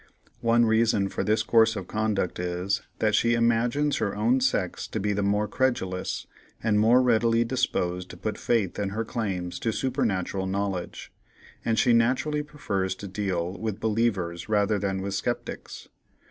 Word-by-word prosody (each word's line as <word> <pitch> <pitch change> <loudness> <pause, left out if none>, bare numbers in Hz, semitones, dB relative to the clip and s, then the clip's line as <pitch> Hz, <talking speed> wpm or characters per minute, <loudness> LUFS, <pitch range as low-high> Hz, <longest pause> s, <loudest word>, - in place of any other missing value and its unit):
One 115 0 +3
reason 110 -3 +2
for - - -2
this 110 +1 +2
course 115 -1 +4
of 95 -4 -5
conduct 105 -5 -1
is, 90 +2 -1 0.2
that 110 -1 +1
she 120 +2 +3
imagines 120 +5 +2
her 100 -3 -1
own 115 +5 +2
sex 125 -8 0
to 110 - -4
be 105 +1 0
the 100 - -1
more 105 +1 +1
credulous, 100 -7 -1 0.4
and 105 -2 +3
more 120 +4 +5
readily 115 -1 +3
disposed 90 -7 -1
to 90 - -10
put 105 +3 -4
faith 110 -6 0
in 100 -1 -1
her 110 +3 -3
claims 95 -7 -3
to 115 - 0
supernatural 105 -7 -1
knowledge, 95 -2 -3 0.5
and 115 -1 0
she 120 +2 +4
naturally 130 +6 +2
prefers 100 -11 -3
to 100 - -8
deal 95 -2 -2
with 110 -2 -3
believers 105 -6 -1
rather 105 -1 +2
than 95 -1 -2
with 100 0 -3
sceptics. 100 - -4
105 Hz, 160 wpm, -26 LUFS, 95-115 Hz, 0.5 s, more